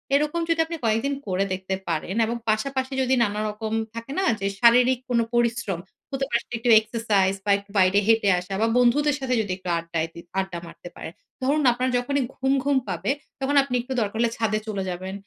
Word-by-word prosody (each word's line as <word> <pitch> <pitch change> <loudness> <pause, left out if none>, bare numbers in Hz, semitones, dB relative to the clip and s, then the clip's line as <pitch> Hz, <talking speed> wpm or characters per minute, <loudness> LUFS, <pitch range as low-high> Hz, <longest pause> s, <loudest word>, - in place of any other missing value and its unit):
এরকম 300 +4 +1
যদি 330 0 +1
আপনি 335 +1 -5
কয়েকদিন 225 +6 +1
করে 190 0 +1
দেখতে 190 +1 -3
পারেন 170 +3 -2
এবং 235 +2 -2
পাশাপাশি 260 +4 -1
যদি 260 0 +2
নানা 210 -1 -1
রকম 215 +1 -5 0.2
থাকে 230 +3 -7
না 385 - +1
যে, 195 - -3
শারীরিক 245 +2 +5
কোনো 235 -2 +2
পরিশ্রম। 235 -6 0 0.3
হতে 270 0 -1
পারে 235 0 +1
একটু 230 +2 -1
exercise 215 -4 0
বা 205 - +2
একটু 200 0 -13
বাইরে 185 +2 +5
হেঁটে 225 -3 +4
আসা 180 +2 -7
বা 225 - +3
বন্ধুদের 270 +4 +3
সাথে 265 -2 -1
যদি 205 -3 -4
একটু 185 -1 -7
আড্ডায় 165 -1 -2
দি - - -10 0.2
আড্ডা 190 -2 -3
মারতে 175 - -11
পারেন। - - -7 0.3
ধরুন 290 +4 +2
আপনার 250 +2 -1
যখনই 280 +3 0
ঘুম, 265 +1 +1
ঘুম 285 -1 +2
পাবে - - -1 0.3
তখন 275 +1 0
আপনি 260 -2 -3
একটু 255 +2 -5
দরকার 210 0 -2
হলে 235 - +3
ছাদে 215 -1 0
চলে 200 -3 -2
যাবেন, 185 +1 -5
230 Hz, 200 wpm, -24 LUFS, 195-260 Hz, 0.3 s, শারীরিক